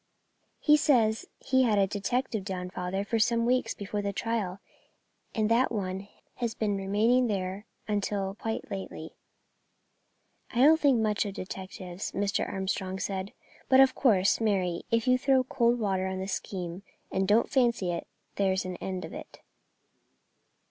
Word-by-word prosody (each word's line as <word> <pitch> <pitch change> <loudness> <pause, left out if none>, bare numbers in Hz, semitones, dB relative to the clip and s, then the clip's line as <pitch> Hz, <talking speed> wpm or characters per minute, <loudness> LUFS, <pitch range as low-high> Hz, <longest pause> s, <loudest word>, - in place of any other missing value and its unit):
"He 300 -1 +5
says 230 -7 +2
he 260 -1 +2
had 225 -5 +3
a 195 - +5
detective 220 +3 -2
down, 180 -2 -4
father, 185 +2 -3
for 225 +2 0
some 230 +1 +2
weeks 250 -2 +1
before 205 +1 -4
the 200 0 -2
trial, 200 -3 -2 0.8
and 215 -2 +2
that 240 +3 +3
one 195 -2 -3 0.3
has 235 -2 -2
been 210 -2 0
remaining 215 +6 +2
there 195 -1 -3 0.2
until 200 -2 -1
quite 225 +2 -5
lately." 190 -4 -6 1.4
"I 240 - 0
don't 315 +3 +7
think 275 -6 +4
much 215 -2 +1
of 200 - -6
detectives," 185 0 -6
Mr. 200 0 -1
Armstrong 190 0 -2
said; 190 0 -3 0.4
"but 260 - +6
of 265 -1 +7
course, 205 -5 +3
Mary, 185 -5 +1
if 230 +1 +1
you 255 0 +4
throw 265 -1 +3
cold 240 -1 +2
water 190 -3 0
on 190 0 -3
the 190 0 -4
scheme 185 -2 -4 0.3
and 190 0 0
don't 215 +3 +4
fancy 235 -8 +2
it, 170 - -4 0.3
there's 190 -1 +1
an 185 -1 -5
end 185 -1 -4
of - - -10
it." - - -10
205 Hz, 155 wpm, -29 LUFS, 190-235 Hz, 1.4 s, don't